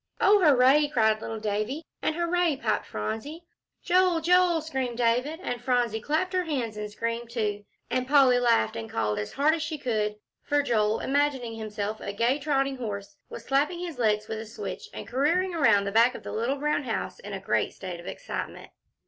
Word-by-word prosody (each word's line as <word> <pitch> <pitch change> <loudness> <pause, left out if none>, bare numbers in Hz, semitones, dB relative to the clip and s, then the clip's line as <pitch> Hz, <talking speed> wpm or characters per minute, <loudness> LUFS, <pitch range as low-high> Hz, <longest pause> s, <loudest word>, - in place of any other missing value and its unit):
"Oh, 405 -1 +5
hooray!" 285 0 +5
cried 220 -6 +2
little 225 0 -5
Davie, 215 +8 -2 0.2
and, 310 - 0
"Hooray!" 345 -2 +1
piped 220 -4 -1
Phronsie. 225 - -5 0.4
"Joel 360 -1 +3
Joel!" 355 0 +4
screamed 265 -6 -3
David; 250 +7 +1
and 245 -7 -3
Phronsie 245 -3 0
clapped 315 - -1
her 365 -1 +1
hands 250 -9 -2
and 210 0 -5
screamed 230 +2 -4
too, 210 -3 -2 0.2
and 255 0 -1
Polly 265 -3 +5
laughed 235 - +2
and 110 -1 -5
called 105 -2 -1
as 105 - -5
hard 295 +3 +3
as 325 - -2
she 310 0 -3
could, 215 -6 -1 0.3
for 290 0 +1
Joel, 215 -4 +1
imagining 270 -4 0
himself 215 -1 -4
a 200 - -4
gay 235 +7 +1
trotting 275 -2 0
horse, 210 +1 -5
was - - -9
slapping 285 +6 +1
his 340 -6 -6
legs 215 -2 +1
with 220 - -4
a 220 - -7
switch, 225 - -7
and - - -8
careering 335 +8 +1
around 225 -11 +4
the 200 - -3
back 235 +4 +4
of - - -9
the - - -6
little 240 +6 -1
brown 300 +1 0
house 235 - -3
in - - -8
a - - -3
great - - 0
state 180 -3 -7
of 170 - -11
excitement. - - -6
250 Hz, 195 wpm, -27 LUFS, 220-300 Hz, 0.4 s, Oh